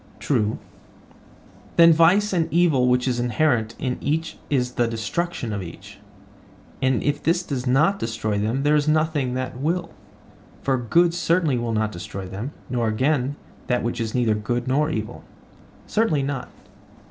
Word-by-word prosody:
True. 110 -7 0 1.2
The 170 0 +8
vice 185 +6 +4
and 170 -3 0
evil 160 -7 +3
which 125 +1 +2
is 125 -1 0
inherent 120 -2 +1
in 125 -2 -3
each 160 +3 -2
is 125 -3 +1
the 120 -1 +1
destruction 115 +3 -3
of 100 - -3
each; 85 -3 -10 0.8
and 130 -2 +1
if 145 0 0
this 170 +3 +1
does 135 -5 -4
not 150 +10 +3
destroy 110 -2 -2
them 115 +6 -1
there 145 +1 +3
is 150 0 +1
nothing 155 -5 +1
else 130 0 -3
that 125 - -11
will; 170 +3 -1 0.7
for 135 - +2
good 165 +8 +2
certainly 165 -5 +1
will 120 -1 -2
not 110 0 0
destroy 95 +1 -7
them, 100 +8 -5 0.2
nor 120 -2 -1
again, 130 +4 0 0.3
that 125 -1 0
which 120 0 -2
is 110 +1 -3
neither 120 -3 +2
good 120 +4 -2
nor 150 +4 +2
evil. 160 - -4 0.6
Certainly 185 -11 +1
not. 135 -2 -3
130 Hz, 160 wpm, -23 LUFS, 120-155 Hz, 1.2 s, The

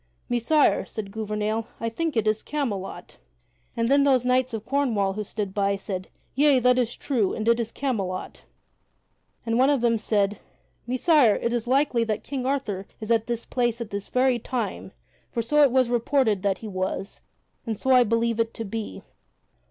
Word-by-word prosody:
"Messire," 245 +5 +3
said 205 -3 -7
Gouvernail, 215 +1 -2
"I 230 - -2
think 310 +4 -2
it 220 - +2
is 215 0 +1
Camelot." 230 -11 -4 0.6
And 230 0 +1
then 280 +2 +4
those 260 -3 +3
knights 255 0 +2
of 220 -1 -5
Cornwall 235 -8 +1
who 210 +2 -3
stood 205 -1 -4
by 200 0 +1
said, 190 -2 -5 0.3
"Yea, 285 0 +4
that 250 0 +3
is 240 -1 -1
true, 230 -9 0
and 220 - -3
it 235 0 +4
is 230 -1 -2
Camelot." 200 -10 -3 1.0
And 230 +1 +1
one 265 +2 +5
of 280 -4 +2
them 230 -2 +2
said: 205 -1 0 0.5
"Messire, 255 -2 +4
it 235 - -1
is 240 -1 -2
likely 260 -2 +2
that 215 -2 -2
King 265 -3 -4
Arthur 210 -9 -2
is 220 +1 -4
at 225 -1 +2
that 235 -1 -3
place 240 -2 0
at 235 -2 -6
this 200 0 -5
very 255 -1 +2
time, 245 +1 -4 0.4
for 230 - -2
so 300 +6 +3
it 285 - +7
was 260 -1 +3
reported 235 -3 +1
that 195 -1 0
he 220 - -8
was, 190 0 -4 0.5
and 220 -2 -2
so 265 - 0
I 250 -1 +7
believe 230 0 0
it 230 0 0
to 225 - -5
be." 220 +1 -6
230 Hz, 185 wpm, -25 LUFS, 210-255 Hz, 1.0 s, it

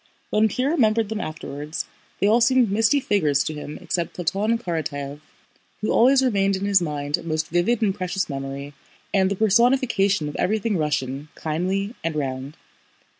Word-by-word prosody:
When 215 +1 +4
Pierre 255 +7 0
remembered 225 -8 +2
them 220 -1 -3
afterwards 150 -1 -5 0.3
they - - +2
all 225 +4 +4
seemed 245 -2 +4
misty 225 +7 +3
figures 155 - +2
to 155 - -3
him 150 0 -7
except 170 -2 -3
Platón 200 +6 0
Karatáev, 145 -6 -4 0.6
who 215 - 0
always 265 +3 +5
remained 195 -5 +2
in 190 +1 -3
his 200 -2 +4
mind 145 -3 -1
a - - -10
most 155 -1 -2
vivid 190 +8 +1
and 200 -3 +2
precious 190 0 -2
memory 140 0 -5 0.4
and 190 -1 +3
the 200 - -1
personification 220 - +3
of 150 - -6
everything 215 +2 0
Russian, 145 -3 -1
kindly, 185 +7 -2
and 165 -1 -2
round. 135 0 -4
190 Hz, 165 wpm, -23 LUFS, 150-220 Hz, 0.6 s, always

